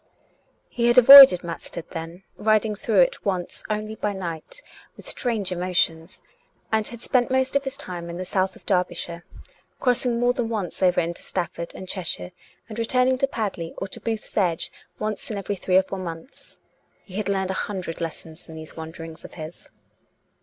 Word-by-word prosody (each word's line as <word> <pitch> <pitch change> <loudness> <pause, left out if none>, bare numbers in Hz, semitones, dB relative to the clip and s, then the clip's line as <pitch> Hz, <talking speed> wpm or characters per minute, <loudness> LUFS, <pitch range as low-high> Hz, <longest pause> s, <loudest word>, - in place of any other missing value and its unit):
He 235 -1 0
had 240 +1 +4
avoided 265 -7 +11
Matstead 170 0 -7
then 165 +2 -7
— - - -42
riding 215 0 +2
through 205 -1 +2
it 175 - +1
once 185 -3 -3
only 215 0 -2
by 210 -1 -2
night, 185 - -5 0.3
with - - -11
strange 220 -7 0
emotions 175 -2 -1 0.2
— - - -41
and 220 -1 +2
had 235 -1 -8
spent 245 -2 +2
most 260 0 +1
of 280 0 +2
his 270 +1 -5
time 175 -10 -6
in 170 - -6
the 185 - -4
south 190 0 0
of - - -17
Derbyshire, 180 -2 -1 0.6
crossing 245 -1 +1
more 245 +1 +3
than 240 -2 -2
once 205 -7 -4
over 180 -1 +4
into 170 0 -2
Stafford 170 -2 -4
and 185 - -8
Chester, 165 - -3 0.4
and 225 0 -7
returning 255 +2 +2
to 275 - +3
Pad 215 -8 -3
ley 165 0 -6
or 195 - -4
to - - -6
Booth's 225 -2 -4
Edge 175 -5 0 0.3
once 215 -1 -3
in 215 - -3
every 200 +1 -3
three 185 0 +2
or 190 - +5
four 190 0 -6
months. 170 +6 -9 0.4
He 190 -1 -9
had 210 -1 -2
learned 190 -1 0
a 190 - -2
hundred 185 -4 -5
lessons 165 0 -7
in 160 - -9
these 160 0 -9
wanderings 160 0 -9
of - - -11
his. 160 0 -9
190 Hz, 190 wpm, -24 LUFS, 170-225 Hz, 0.6 s, avoided